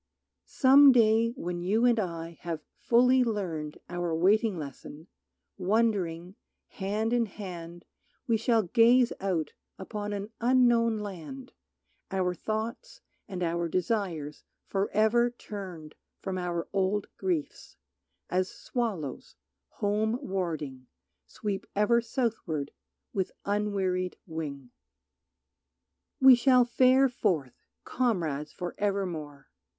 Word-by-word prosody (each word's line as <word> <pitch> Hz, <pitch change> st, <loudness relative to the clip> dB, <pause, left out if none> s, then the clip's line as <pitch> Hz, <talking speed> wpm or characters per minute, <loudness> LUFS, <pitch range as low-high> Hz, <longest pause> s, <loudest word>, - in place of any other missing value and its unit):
Some 275 Hz, +1 st, +7 dB
day 230 Hz, -1 st, +4 dB
when 175 Hz, -7 st, -4 dB
you 210 Hz, +7 st, +2 dB
and 240 Hz, -2 st, +4 dB
I 170 Hz, -4 st, -4 dB
have 165 Hz, -3 st, -4 dB
fully 250 Hz, +2 st, +4 dB
learned 175 Hz, -10 st, -3 dB
Our 175 Hz, -2 st, -2 dB
waiting 200 Hz, +4 st, +3 dB
lesson, 150 Hz, +1 st, -8 dB, 0.5 s
wondering, 185 Hz, -4 st, 0 dB, 0.4 s
hand 215 Hz, +4 st, -2 dB
in 235 Hz, -2 st, +2 dB
hand 175 Hz, -4 st, -8 dB, 0.4 s
We 230 Hz, -4 st, +2 dB
shall 225 Hz, 0 st, +2 dB
gaze 235 Hz, +5 st, +4 dB
out 185 Hz, -5 st, -1 dB, 0.2 s
upon 205 Hz, +1 st, -5 dB
an 205 Hz, +1 st, -4 dB
unknown 235 Hz, -2 st, +4 dB
land, 210 Hz, +6 st, -8 dB, 0.6 s
Our 185 Hz, -2 st, 0 dB
thoughts 220 Hz, -, -5 dB, 0.3 s
and 185 Hz, -3 st, -4 dB
our 170 Hz, 0 st, 0 dB
desires 175 Hz, -5 st, -2 dB, 0.2 s
forever 215 Hz, +4 st, +2 dB
turned 190 Hz, -9 st, -8 dB, 0.3 s
From 190 Hz, -1 st, -4 dB
our 175 Hz, -1 st, -3 dB
old 195 Hz, +1 st, +1 dB
griefs, 335 Hz, -7 st, -3 dB, 0.5 s
as 185 Hz, +1 st, 0 dB
swallows, 205 Hz, -, -4 dB, 0.3 s
home 215 Hz, -, -1 dB
warding, 160 Hz, -, -4 dB, 0.4 s
Sweep 205 Hz, -3 st, -4 dB
ever 210 Hz, +3 st, +3 dB
southward 220 Hz, -, -2 dB, 0.4 s
with 190 Hz, -2 st, -1 dB
unwearied 195 Hz, -3 st, -1 dB
wing. 145 Hz, -6 st, -6 dB, 1.5 s
We 265 Hz, -1 st, +9 dB
shall 250 Hz, 0 st, +5 dB
fare 255 Hz, +2 st, +4 dB
forth, 180 Hz, -, -1 dB, 0.3 s
comrades 165 Hz, -, -1 dB
for 175 Hz, -1 st, -5 dB
evermore. 170 Hz, -9 st, -3 dB
200 Hz, 105 wpm, -29 LUFS, 170-230 Hz, 1.5 s, We